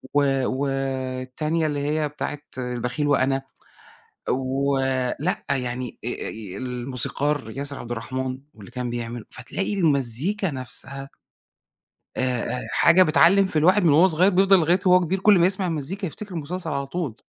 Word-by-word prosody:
و 145 - +5 0.2
والتانية 135 +3 -2
اللي 145 -1 -2
هي 150 +1 0
بتاعة 145 0 -5 0.2
البخيل 125 +3 -2
وأنا، 135 -1 +2 0.9
ولأ 135 +3 0
يعني 125 -2 -2
أ - - -1
أ 105 -5 -6
الموسيقار 130 +2 -2
ياسر 140 0 -4
عبدالرحمن، 130 +2 -4 0.2
واللي 105 -1 -13
كان 125 0 -4
بيعمل 120 -1 -5
فتلاقي 195 +10 -3
المزيكا 160 - 0
نفْسها، 135 +1 -5 1.1
آآ، - - 0 0.4
آآ - - -7
حاجة 170 +2 +6
بتعلّم 180 +4 +5
في 160 -4 0
الواحد 185 +6 +4
من 170 - +5
وهو 165 +6 +6
صغيّر 180 +2 +3
بيفضل 195 +1 +5
لغاية 170 +3 +3
وهو 180 0 +7
كبير 180 +3 -1
كلّ 200 -1 +5
ما 170 - +5
يسمع 190 0 -1
المزيكا 170 +5 -3
يفتكر 195 +4 -8
مسلسل 165 +2 -4
على 140 0 -2
طول. 155 -7 -3
140 Hz, 140 wpm, -24 LUFS, 130-170 Hz, 1.1 s, وهو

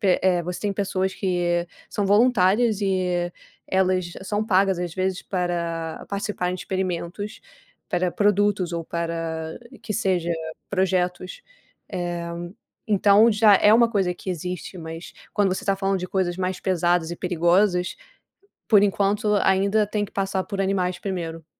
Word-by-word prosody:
pe 190 -3 +3
eh, 180 -2 +3
você 180 +1 -5
tem 205 -1 -1
pessoas 190 -1 -1
que 175 -2 0 0.2
são 205 -2 -1
voluntárias 210 0 +3
e 180 -3 0 0.3
elas 185 -2 +1
são 205 +2 -1
pagas 190 -2 +3
às 175 -2 -4
vezes 185 -1 -1
para 170 -3 -3
participarem 200 -3 -2
de - - -7
experimentos 185 +2 -3 0.5
para 180 0 0
produtos 205 -3 +2
ou 170 -1 -2
para, 165 -1 -4 0.2
que 215 - -4
seja, 185 -5 0 0.4
projetos. 185 - -1 0.5
Eh, 175 -1 -3 0.6
então 205 +2 +5
já 210 -1 +6
é 210 - +5
uma 235 0 +5
coisa 190 -5 +1
que 190 - -10
existe, 180 +2 -5
mas 165 0 -8 0.2
quando 195 -3 +2
você - - -6
tá 195 -1 +1
falando 195 0 0
de 180 0 -5
coisas 185 -2 0
mais 185 0 -2
pesadas 175 -2 +1
e 170 - -5
perigosas, 180 - +2 0.7
por 205 -3 +6
enquanto 205 +1 +1
ainda 200 +2 +2
tem 210 0 -1
que - - -11
passar 195 -1 -1
por 200 -2 -4
animais 185 -2 0
primeiro. 165 -5 -5
185 Hz, 145 wpm, -24 LUFS, 175-200 Hz, 0.7 s, já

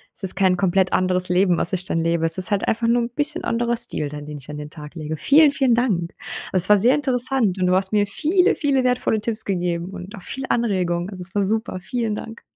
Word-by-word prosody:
Es - - -16
ist 185 - +5
kein 185 -2 +2
komplett 190 0 +1
anderes 185 -1 +4
Leben, 180 -1 +2
was - - -1
ich 185 0 -2
dann 165 - -1
lebe. 165 0 0
Es 165 +2 +3
ist 185 +3 -3
halt 200 -1 0
einfach 230 +1 0
nur 240 +1 +2
'n 235 - -4
bisschen 295 +6 -2
anderer 235 0 -1
Stil 150 -10 0
dann, 150 0 -8
den 150 -1 -7
ich 135 +2 -15
an 150 - -6
den 150 0 -8
Tag 150 +1 -11
lege. 155 -1 -5
Vielen, 295 - +5
vielen 265 -4 +2
Dank. 195 -9 -1 0.4
Es 180 -1 +3
war 210 - +6
sehr 235 +6 +3
interessant 255 -7 0
und 180 - +1
du 180 - +2
hast 190 +2 -1
mir 205 -1 +3
viele, 355 - +1
viele 275 -4 0
wertvolle 250 -4 0
Tipps 220 0 +1
gegeben 175 -2 -2
und 190 0 -9
auch 190 - -11
viel 265 - -7
Anregung. 185 -6 -1
Also, 185 -3 -8
es 185 +1 -1
war 205 - +2
super. 215 -1 0
Vielen 225 0 -3
Dank. 225 +2 -9
195 Hz, 250 wpm, -21 LUFS, 180-235 Hz, 0.4 s, war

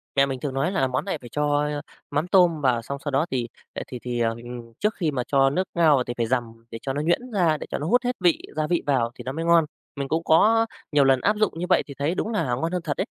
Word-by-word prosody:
Mẹ 140 0 +5
mình 135 -2 -4
thường 140 0 -4
nói 135 +7 0
là 165 -9 +1
món 130 0 -2
này - - -2
phải 120 - -10
cho 145 +2 +1 0.5
mắm 145 +4 0
tôm 175 -5 +4
vào 125 -3 +2
xong 140 +4 -5
sau 145 - -2
đó 140 +4 +2
thì, 120 -2 -1 0.3
ờ, - - -4
thì 125 - -7
thì, 120 -1 -3
ờ, 115 -1 +2
ừm, 120 -1 -9
trước 210 +1 0
khi 160 -5 -1
mà 125 -3 -2
cho 135 -1 +4
nước 185 +6 -1
ngao 165 -4 +5
vào 130 - +1
thì 120 - -5
phải 120 - +1
dằm 115 -1 -3
để 115 - -5
cho 135 - -3
nó 145 - -2
nhuyễn 175 +11 0
ra, 170 -6 +2
để - - -8
cho - - -2
nó 150 - -4
hút 245 +6 +3
hết 245 0 -1
vị, 175 -3 +3
gia 155 0 0
vị 175 0 +1
vào 125 -5 +1
thì - - -9
nó 130 - -4
mới 165 +4 -4
ngon. 170 -1 +5 0.3
Mình 140 -1 -3
cũng 160 +3 -1
có 220 +9 +4 0.3
nhiều 145 -2 +4
lần 135 -1 +4
áp 210 +1 +2
dụng 215 -3 +1
như 180 - -1
vậy 185 - +4
thì 140 - -8
thấy 150 +5 0
đúng 215 - -2
là 215 - 0
ngon 165 +7 -2
hơn 180 -1 -1
thật 145 -3 -3
đấy. 190 - 0
145 Hz, 300 wpm, -24 LUFS, 130-170 Hz, 0.5 s, Mẹ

